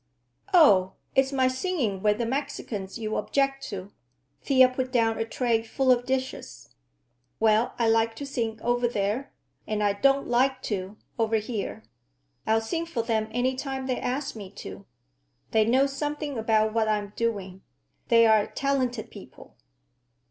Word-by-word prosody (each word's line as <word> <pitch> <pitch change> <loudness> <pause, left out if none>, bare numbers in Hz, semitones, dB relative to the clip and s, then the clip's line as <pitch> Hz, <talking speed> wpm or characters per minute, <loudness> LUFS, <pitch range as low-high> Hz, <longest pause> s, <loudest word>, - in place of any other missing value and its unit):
"Oh, 200 - +6 0.2
it's 270 0 +3
my 260 -2 +2
singing 255 - -1
with 210 0 +2
the 235 - -1
Mexicans 235 -7 -4
you 215 -2 -3
object 275 +4 0
to?" 195 -1 -7 0.5
Thea 260 -2 +5
put 255 0 -3
down 225 -3 +2
a 225 - 0
tray 230 -1 0
full 255 +3 +1
of 245 0 +2
dishes. 260 0 -4 0.7
"Well, 220 +1 +2
I 235 - +2
like 225 0 +2
to 285 - -6
sing 230 -5 -3
over 245 0 +1
there, 215 +4 -2 0.4
and 210 -1 -1
I 205 -1 +2
don't 275 +6 +2
like 255 +2 +1
to 195 0 -4 0.2
over 225 0 +2
here. 215 -1 -3 0.6
I'll 220 0 +3
sing 330 +9 -3
for 245 -9 -2
them 220 -2 0
any 245 +3 0
time 265 0 -4
they 255 -1 -1
ask 260 +2 -3
me 200 -3 -8
to. 95 - -9 0.6
They 220 -1 +4
know 260 +4 +4
something 290 +1 -3
about 220 -1 +1
what 225 -1 +1
I'm 210 -1 -1
doing. 195 -5 -3 0.5
They're 225 -3 +5
a - - -16
talented 255 -4 -1
people." - - -13
230 Hz, 155 wpm, -26 LUFS, 215-265 Hz, 0.7 s, Oh